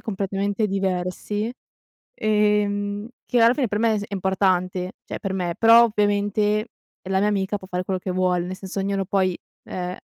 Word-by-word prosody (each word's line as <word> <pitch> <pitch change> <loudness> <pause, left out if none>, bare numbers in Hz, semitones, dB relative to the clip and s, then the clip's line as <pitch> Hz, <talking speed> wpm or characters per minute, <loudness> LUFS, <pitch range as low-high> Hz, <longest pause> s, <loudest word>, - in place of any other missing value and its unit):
completamente 200 +1 -1
diversi, 195 +3 -2 0.6
ehm, 210 - +1 0.2
che 245 -2 +1
alla 230 +2 +6
fine 260 -6 0
per 210 - -1
me 220 -2 +2
s - - -5
è 205 - -6
importante, 185 -1 0
cioè - - -6
per 195 - -3
me, 175 -3 -2
però 230 +1 +7
ovviamente 210 0 +1 0.3
è 185 - -11
la 190 0 +1
mia 210 - +2
amica, 200 0 0
può 190 -1 -11
fare 180 0 -2
quello 185 -1 -2
che 185 - -4
vuole, 180 -1 +1
nel 185 +1 -5
senso 195 0 -5
ognuno 195 0 -1
poi, 185 -2 +1 0.3
ehm, 180 0 -5
200 Hz, 180 wpm, -23 LUFS, 185-210 Hz, 0.6 s, però